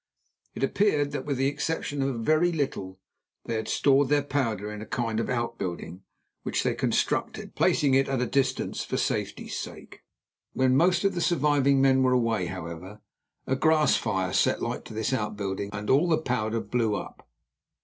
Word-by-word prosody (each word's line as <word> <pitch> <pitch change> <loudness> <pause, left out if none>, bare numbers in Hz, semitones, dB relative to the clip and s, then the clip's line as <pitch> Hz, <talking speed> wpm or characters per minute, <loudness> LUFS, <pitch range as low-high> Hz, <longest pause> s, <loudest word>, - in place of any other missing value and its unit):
It - - -4
appeared 145 -2 +2
that, 145 - -4
with 140 -3 -2
the 135 - +1
exception 145 0 -2
of 135 -1 0
a - - -5
very 155 +9 +2
little, 115 - -3 0.5
they - - -3
had 110 -1 -2
stored 140 -1 +3
their 145 -1 +3
powder 115 -8 -2
in 105 - -7
a - - -6
kind 115 -2 -2
of 115 - -2
outbuilding 100 -7 -4 0.4
which - - -1
they - - +1
constructed, - - -1
placing 140 -3 +2
it 135 +1 +3
at 135 -2 0
a 125 - +1
distance 135 +1 -1
for - - -3
safety's - - -2
sake. - - -8 0.5
When 130 -1 +2
most 175 +5 +3
of 195 -1 +2
the 175 - -2
surviving 140 -4 +3
men 130 -1 +4
were 130 -1 +3
away, 115 -7 +1
however, 90 +3 -7 0.5
a 130 - 0
grass 155 +2 +3
fire 95 -4 -1
set - - +2
light - - -4
to 110 - -9
this 110 +4 -1
outbuilding 100 -4 -3
and 105 0 -6
all 145 +7 +4
the 160 -2 +3
powder 115 -6 -1
blew 115 -3 0
up. - - -8
130 Hz, 180 wpm, -27 LUFS, 110-145 Hz, 0.5 s, men